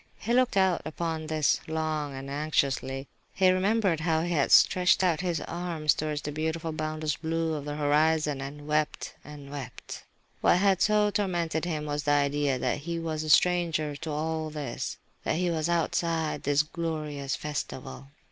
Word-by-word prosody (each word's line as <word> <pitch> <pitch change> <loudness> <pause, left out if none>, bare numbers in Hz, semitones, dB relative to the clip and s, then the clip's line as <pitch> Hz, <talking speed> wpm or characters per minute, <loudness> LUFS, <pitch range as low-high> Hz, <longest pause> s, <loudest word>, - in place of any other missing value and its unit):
He 235 - -2
looked 250 -4 +3
out 190 -2 +3
upon 160 0 -3
this, 155 -2 +2
long 155 -3 -2
and 135 +1 -7
anxiously. 140 -2 -1 0.3
He 185 -1 +5
remembered 190 -2 +2
how 160 0 +1
he 175 - -2
had 150 -5 +1
stretched 180 +1 +5
out 175 -2 +2
his 175 -4 -1
arms 170 -3 0
towards 150 -1 -3
the 150 - -3
beautiful, 160 +2 -2
boundless 155 -1 -2
blue 165 0 -1
of 145 -2 -4
the 145 0 -4
horizon, 150 -1 +2
and 145 +2 -7
wept, 150 0 -1
and 145 -1 -11
wept. 135 -4 -7 0.4
What - - +5
had 195 -1 +3
so 210 -1 +3
tormented 175 -5 -1
him 155 -3 -2
was 145 0 -2
the 145 0 +1
idea 145 -1 +1
that 130 - -1
he 170 +3 -4
was 160 -2 -3
a 155 - -5
stranger 165 -3 +3
to 160 +1 -6
all 155 +1 -2
this, 150 -2 -4 0.3
that - - 0
he 175 +1 0
was 160 0 -1
outside 165 -1 0
this 145 +1 +2
glorious 155 -4 -3
festival. 135 -2 -5
155 Hz, 170 wpm, -28 LUFS, 145-170 Hz, 0.4 s, He